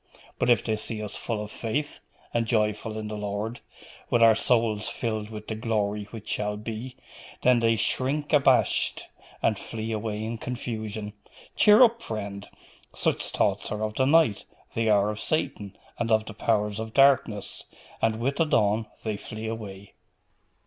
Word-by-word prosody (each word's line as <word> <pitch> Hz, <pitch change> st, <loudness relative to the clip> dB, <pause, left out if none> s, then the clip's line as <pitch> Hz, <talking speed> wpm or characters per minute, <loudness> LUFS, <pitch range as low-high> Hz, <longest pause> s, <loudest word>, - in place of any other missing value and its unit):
But -, -, +1 dB
if 120 Hz, -2 st, +4 dB
they 110 Hz, -1 st, 0 dB
see 110 Hz, +1 st, -3 dB
us 105 Hz, -, -3 dB
full 110 Hz, -3 st, -3 dB
of 105 Hz, -, -8 dB
faith, 145 Hz, +6 st, -3 dB, 0.3 s
and 115 Hz, -1 st, +1 dB
joyful 110 Hz, -1 st, 0 dB
in 110 Hz, -1 st, -4 dB
the 105 Hz, -, -5 dB
Lord, 105 Hz, +3 st, -3 dB, 0.5 s
with 120 Hz, -, +4 dB
our 115 Hz, -1 st, +8 dB
souls 110 Hz, -2 st, +1 dB
filled 110 Hz, -3 st, -3 dB
with 110 Hz, -1 st, -8 dB
the -, -, -2 dB
glory 105 Hz, -2 st, -1 dB
which 105 Hz, 0 st, -10 dB
shall 105 Hz, 0 st, -1 dB
be, 115 Hz, +4 st, -6 dB, 0.5 s
then 125 Hz, -1 st, +5 dB
they 115 Hz, 0 st, +3 dB
shrink 135 Hz, +7 st, 0 dB
abashed, 145 Hz, -2 st, +3 dB, 0.3 s
and 110 Hz, -3 st, +2 dB
flee 110 Hz, 0 st, -5 dB
away 110 Hz, -1 st, -3 dB
in 115 Hz, +1 st, -4 dB
confusion." 110 Hz, -4 st, -5 dB, 0.4 s
Cheer 210 Hz, +4 st, +7 dB
up, 235 Hz, -1 st, +3 dB
friend! 100 Hz, -, -5 dB, 0.5 s
such -, -, 0 dB
thoughts -, -, 0 dB
are 105 Hz, 0 st, -2 dB
of 110 Hz, 0 st, -2 dB
the 130 Hz, -, +2 dB
night, 155 Hz, -8 st, +4 dB, 0.3 s
the 115 Hz, -1 st, +1 dB
hour 105 Hz, 0 st, +4 dB
of 105 Hz, -, -7 dB
Satan 105 Hz, -11 st, -2 dB, 0.2 s
and 120 Hz, -1 st, -1 dB
of 110 Hz, 0 st, +3 dB
the 110 Hz, -, -8 dB
powers 105 Hz, -1 st, 0 dB
of 110 Hz, 0 st, -6 dB
darkness; 135 Hz, -7 st, +3 dB, 0.4 s
and 110 Hz, 0 st, +1 dB
with 135 Hz, +4 st, -1 dB
the 165 Hz, -, +3 dB
dawn 110 Hz, -6 st, +2 dB, 0.2 s
they 110 Hz, -2 st, -2 dB
flee 110 Hz, +2 st, -7 dB
away. 100 Hz, -3 st, -6 dB
110 Hz, 170 wpm, -26 LUFS, 105-115 Hz, 0.5 s, our